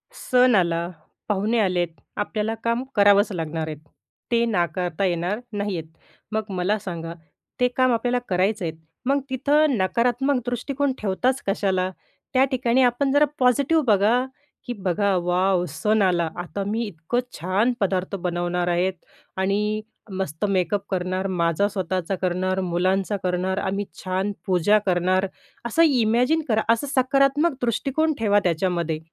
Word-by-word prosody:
सण 250 -1 +3
आला, 170 -2 +1 0.4
पाहुणे 210 +3 +1
आलेत, 180 -4 +1 0.3
आपल्याला 215 +1 -1
काम 235 +2 0
करावंच 205 +1 +5
लागणार 160 -3 -3
आहेत. 155 -1 -5 0.5
ते 235 0 +3
नाकारता 180 -3 -1
येणार 180 +3 -1 0.2
नाहीयेत. 200 -5 -2 0.5
मग 215 0 -2
मला 190 +2 0
सांगा 170 -4 -6 0.5
ते 250 - +4
काम 255 -1 +4
आपल्याला 245 +2 +1
करायचंय, 185 -1 0 0.3
मग 275 +2 +2
तिथं 285 +1 +2
नकारात्मक 245 +8 +1
दृष्टिकोन 265 +3 -1
ठेवताच 250 +7 0
कशाला? 190 -2 +1 0.4
त्या 260 0 +5
ठिकाणी 255 -1 +2
आपण 250 +3 +2
जरा 290 +2 +5
पॉझिटिव्ह 280 +5 +3
बघा, 220 +4 +3 0.4
की 245 - -3
बघा 195 -1 0
वॅाव! 180 +1 +2
सण 210 +8 +1
आला 175 -4 +2
आता 175 +3 -4
मी 220 +3 -1
इतकं 190 +4 -2 0.2
छान 195 +8 +1
पदार्थ 190 -1 -1
बनवणार 175 -1 -2
आहेत 175 +2 +1 0.4
आणि 210 +3 0 0.3
मस्त 190 -2 -3
मेकअप 190 +1 +1
करणार, 185 +1 -1
माझा 175 +1 +1
स्वतःचा 190 -2 -2
करणार, 185 +1 0
मुलांचा 185 +3 0
करणार, 185 +1 -1
आम्ही 200 +1 -2 0.2
छान 190 +2 -1
पूजा 190 +3 +3
करणार 185 +1 +2 0.4
असं 240 +8 +3
इमॅजिन 250 +2 +2
करा 220 -3 +2
असं 230 +5 -3
सकारात्मक 275 +4 +3
दृष्टिकोन 275 +6 0
ठेवा 205 -2 +3
त्याच्यामध्ये. 170 -2 0
200 Hz, 135 wpm, -23 LUFS, 180-240 Hz, 0.5 s, करावंच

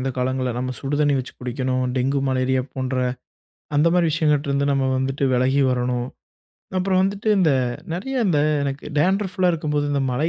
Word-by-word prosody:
இந்த 135 +1 -1
காலங்கள்ல. 130 0 -1
நம்ம 130 +1 -2
சுடுதண்ணீ 145 +1 +1
வச்சு 130 - -5
குடிக்கணும். 130 +1 -1
டெங்கு, 135 +2 +1
மலேரியா 130 0 +1
போன்ற 130 0 -2 0.8
அந்தமாரி 170 +3 +3
விஷயங்கட்ட 150 -2 +1
இருந்து 140 0 +1
நம்ம 135 -1 +1
வந்துட்டு 135 +1 -1
விலகி 130 +3 +2
வரணும். 125 -1 -1 0.7
அப்புறம் 185 0 +2
வந்துட்டு 200 +3 -1
இந்த 175 -5 +4 0.4
நிறைய 265 +10 -4
இந்த 165 -6 +2 0.2
எனக்கு 140 0 -3
டான்ட்ரஃப்லாம் 185 +1 +2
இருக்கும்போது, 150 -2 -1
இந்த 140 - +1
மழை 150 +6 0
140 Hz, 150 wpm, -22 LUFS, 130-165 Hz, 0.8 s, இந்த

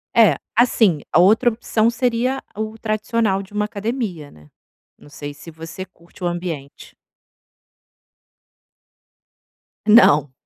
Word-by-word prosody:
É, 215 -10 +6 0.2
assim, 220 - +3
a - - +5
outra 220 +7 +5
opção 225 0 0
seria 245 +2 -1
o 220 +1 -5
tradicional 215 -2 -1
de 195 - -18
uma 210 0 0
academia, 210 - -4
né. 75 -1 -19 0.5
Não 145 - -18
sei 145 -1 -8
se 165 +3 -12
você 165 +4 -8
curte 175 0 -17
o - - +1
ambiente. 170 -5 -6 2.9
Não. 155 - +5
200 Hz, 115 wpm, -20 LUFS, 165-225 Hz, 2.9 s, É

